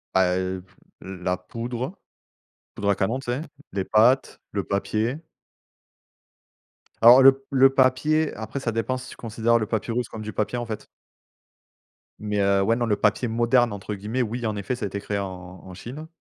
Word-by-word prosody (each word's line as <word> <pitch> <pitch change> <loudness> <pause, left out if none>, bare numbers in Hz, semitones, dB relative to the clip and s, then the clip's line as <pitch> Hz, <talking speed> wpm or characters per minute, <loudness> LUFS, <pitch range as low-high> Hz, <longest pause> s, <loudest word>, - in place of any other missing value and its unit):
Bah, 90 -1 +4
heu, 95 0 -3
f - - -27 0.3
la 90 -1 -3
poudre 120 - -5 0.8
poudre 100 - -1
à 100 - +4
canon, 110 +7 0
tu - - -11
sais? 130 +5 -2 0.3
Les 95 -1 -2
pâtes, 120 +5 +3
le 100 -1 -2
papier. 110 - -1 1.8
Alors 120 +3 +9
le 135 0 +6
le 135 0 +6
papier, 140 +4 +2
après 110 +5 -5
ça 120 -3 -2
dépend 115 +3 -1
si 130 0 -9
tu - - -10
considère 115 +1 +1
le 110 - -2
papyrus 115 +1 -2
comme 110 - -7
du 110 0 -6
papier, 110 +5 -1
en 120 - -3
fait. 110 -2 -6 1.3
Mais, 105 -1 -2
heu, 100 0 +3
ouais, 115 +4 +2
non, 120 0 -1
le 105 - +2
papier 105 +4 +1
«moderne» 120 +1 +2
entre 100 +1 -5
guillemets, 105 +6 -2
oui 120 +1 -4
en 110 - -2
effet 100 +5 -3
ça 120 - -4
a - - -1
été 100 +1 -5
créé 100 0 -3
en 100 - -2 0.4
en 95 - -11
Chine. 130 - -8
115 Hz, 185 wpm, -24 LUFS, 100-125 Hz, 1.8 s, Alors